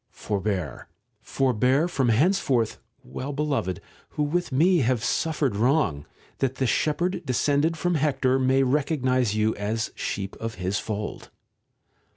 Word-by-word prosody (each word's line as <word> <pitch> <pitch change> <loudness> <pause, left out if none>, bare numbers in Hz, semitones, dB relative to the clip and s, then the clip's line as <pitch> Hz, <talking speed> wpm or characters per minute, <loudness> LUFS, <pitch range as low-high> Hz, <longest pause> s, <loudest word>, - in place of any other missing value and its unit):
Forbear, 95 - -3 0.3
forbear, 130 +5 +1
from 135 -8 0
henceforth, 130 - +2 0.2
well 130 - -6
beloved, 140 - -1 0.3
who 150 - -2
with 170 +3 -1
me 170 +7 +4
have 125 -3 +1
suffered 150 -3 0
wrong, 115 - +1 0.3
that 135 -1 0
the 130 - -1
shepherd 155 +8 0
descended 145 +4 +1
from 175 +2 0
Hector 135 -4 +1
may 130 +1 +3
recognize 130 -4 +1
you 110 +1 +2
as 110 +2 -2
sheep 95 -1 -4
of 115 0 -5
his 95 +3 -2
fold. 105 -1 -5
130 Hz, 130 wpm, -25 LUFS, 110-150 Hz, 0.3 s, me